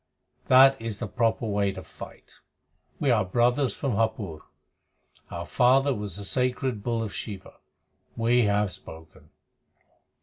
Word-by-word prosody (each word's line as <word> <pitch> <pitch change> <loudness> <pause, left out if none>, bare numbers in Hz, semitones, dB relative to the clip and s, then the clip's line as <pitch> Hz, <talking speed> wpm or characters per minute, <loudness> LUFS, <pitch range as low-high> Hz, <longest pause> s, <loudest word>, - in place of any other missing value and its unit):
That 135 0 +6
is 115 -3 -4
the 120 - -4
proper 115 +2 0
way 100 -2 0
to - - -8
fight. - - -13 0.6
We 140 - +2
are 110 -3 +3
brothers 120 +7 +1
from 140 - -2
Hapur. 110 -7 -2 0.9
Our 85 0 -6
father 135 +5 +3
was 105 -5 -5
a 100 - -6
sacred 125 0 -1
bull 115 +1 -1
of 105 - -6
Shiva. 100 -4 -8 0.6
We 120 +1 +3
have 100 -1 +1
spoken." 80 -2 -12
115 Hz, 135 wpm, -26 LUFS, 100-125 Hz, 0.9 s, That